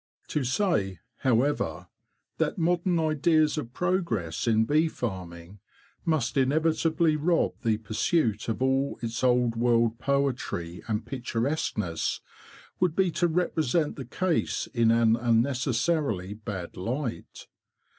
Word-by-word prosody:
To 150 - 0
say, 120 - 0 0.2
however, 125 - 0 0.5
that - - 0
modern 175 +1 +1
ideas 155 0 +2
of 145 -7 -4
progress 125 - -1
in 110 -1 +3
bee 155 +6 +3
farming 95 - -6 0.5
must 150 -7 0
inevitably 160 +3 +2
rob 165 +3 +1
the 110 -4 +1
pursuit 110 - 0
of 115 +3 -1
all 135 +1 +1
its 115 +1 -3
old 125 -2 +3
world 115 -1 +2
poetry 130 -11 -1
and 110 0 -2
picturesqueness, 120 - -2 0.6
would 180 -3 +1
be 185 -1 +2
to 175 - +1
represent 160 -3 0
the 135 - -7
case 175 +7 -1
in 115 -3 +3
an 115 -1 +4
unnecessarily 120 - 0
bad 100 -4 -7
light. 120 - -4
125 Hz, 115 wpm, -27 LUFS, 110-155 Hz, 0.6 s, an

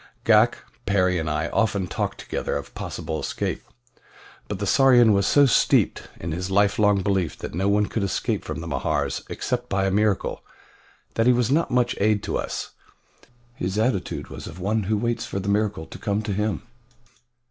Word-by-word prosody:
Ghak, - - +5 0.3
Perry, 90 -2 +2
and 80 -1 -2
I 75 - -1
often 100 -4 +1
talked 90 - -3
together - - -3
of - - -8
possible 80 -2 -4
escape, - - -3 0.9
but 100 - -4
the 100 - -3
Sarian 120 -2 +5
was 100 -1 +2
so 145 -1 +6
steeped 130 - +2
in 85 - -4
his 90 +3 -3
lifelong 100 0 +3
belief 95 -5 0
that - - -7
no 95 +4 0
one 105 +1 +3
could 110 - -3
escape 100 -1 -1
from - - -5
the 85 - -6
Mahars 70 -5 -1
except 125 0 -3
by 95 0 +1
a 95 - +1
miracle, 105 0 0 0.7
that 115 +1 +1
he 125 - +6
was 125 0 +1
not 160 +4 +2
much 120 -1 +1
aid 105 0 +2
to - - -3
us - - -4 0.8
his 95 -3 -3
attitude 110 -4 -1
was - - -8
of 85 - -9
one 105 +3 0
who 110 +2 +1
waits 120 +2 -1
for 100 - -3
the 100 +1 -3
miracle 100 -5 0
to - - -11
come 105 +1 -1
to 105 -1 -2
him. 105 -1 -1
100 Hz, 185 wpm, -24 LUFS, 95-110 Hz, 0.9 s, so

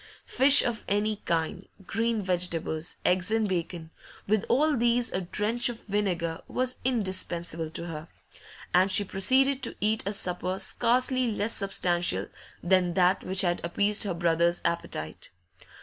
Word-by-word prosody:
Fish 270 +2 +6
of 235 -3 -3
any 210 +1 0
kind, 165 +3 -2 0.2
green 225 0 -1
vegetables, 175 -3 -2
eggs 180 +1 +2
and 220 -1 +1
bacon, 170 -3 -4 0.4
with 210 0 +1
all 295 +5 +3
these 240 0 +1
a 190 - -2
drench 210 +7 +1
of 235 -1 -8
vinegar 180 -5 -2
was 255 0 -2
indispensable 185 -8 -2
to 165 +2 -5
her. 160 -1 -7 0.7
And 185 +2 +4
she 205 - +4
proceeded 260 +8 +3
to - - -4
eat 215 +2 +1
a 200 - -1
supper 185 -1 -1
scarcely 250 +5 +1
less 210 +1 -2
substantial 175 -3 0 0.3
than 180 -1 +2
that 185 0 +2
which 190 0 +1
had 175 -2 0
appeased 205 +5 +1
her 195 -4 -1
brother's 170 0 +1
appetite. 80 - -4
190 Hz, 145 wpm, -27 LUFS, 175-225 Hz, 0.7 s, Fish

